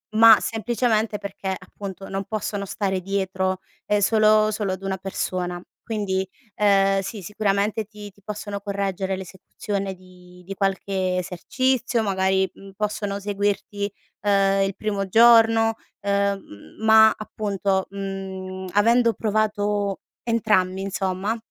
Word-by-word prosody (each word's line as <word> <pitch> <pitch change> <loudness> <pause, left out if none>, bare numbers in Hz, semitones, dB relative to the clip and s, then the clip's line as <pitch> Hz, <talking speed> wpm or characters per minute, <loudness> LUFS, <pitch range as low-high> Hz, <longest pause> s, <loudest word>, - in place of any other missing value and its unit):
ma 225 -1 +9
semplicemente 225 -1 0
perché, 195 -1 -4
appunto, 195 +1 -9
non 195 0 -3
possono 205 -1 -3
stare 190 -1 -2
dietro, 190 -1 -1 0.3
ehm, 210 - +2
solo 215 +1 +4
solo 205 -3 -1
ad 185 - -7
una 195 0 -1
persona. 180 -2 -3 0.2
Quindi, 195 -4 -2 0.3
ehm, 195 -1 +3
sì 200 +2 -6
sicuramente 205 +2 0
ti 210 -1 -11
ti 200 - -26
possono 205 -1 -5
correggere 195 -2 -2
l'esecuzione 195 +1 -5
di 180 -1 -17
di 195 - -5
qualche 190 -1 -1
esercizio, 245 +7 0
magari, 190 -2 +1
mhmm, 195 0 -13
possono 205 -1 -2
seguirti, 205 0 -2 0.3
ehm, 195 -1 +3
il 195 -1 -2
primo 200 -2 -2
giorno, 225 0 +6 0.2
ehm, 200 - -2
ma 220 0 +7
appunto, 200 -3 -2
mhmm, 190 -1 -6
avendo 230 +3 +4
provato 205 -2 0 0.2
entrambi 210 -5 +1
insomma, 195 +2 -2
200 Hz, 120 wpm, -23 LUFS, 190-215 Hz, 0.3 s, ma